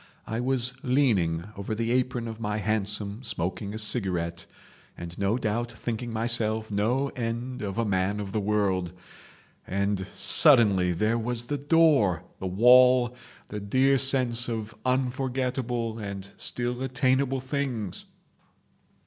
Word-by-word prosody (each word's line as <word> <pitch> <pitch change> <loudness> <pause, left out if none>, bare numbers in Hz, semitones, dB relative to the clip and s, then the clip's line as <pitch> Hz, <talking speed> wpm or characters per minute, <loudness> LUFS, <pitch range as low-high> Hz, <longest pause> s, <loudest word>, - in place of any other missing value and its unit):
I 110 - -3
was 125 0 +2
leaning 105 - +1
over 100 +2 -4
the 115 +1 -1
apron 125 -1 0
of 110 0 -7
my 105 -2 -2
hansom 105 0 -2
smoking 100 -1 -3
a 110 - -5
cigarette, 90 -7 -1 0.5
and 85 0 -8
no 100 +4 +1
doubt 115 0 -2
thinking 115 +1 -5
myself 110 -1 0
no 120 +7 0
end 125 +1 -4
of 100 0 -4
a 115 - +1
man 100 0 0
of 100 -2 -5
the 110 - -1
world, 100 -4 0 0.7
and 100 0 -1
suddenly 105 - +5
there 110 +7 0
was 120 +1 -2
the 145 +4 -3
door, 140 - +3 0.2
the 95 - -4
wall, 125 +4 +5 0.3
the 105 - -5
dear 130 +7 +2
sense 125 -3 +4
of 110 -1 -4
unforgettable 125 -2 -1
and 100 -1 -7
still 120 +1 -3
attainable 130 +1 +1
things. 130 - -4
115 Hz, 130 wpm, -26 LUFS, 100-125 Hz, 0.7 s, suddenly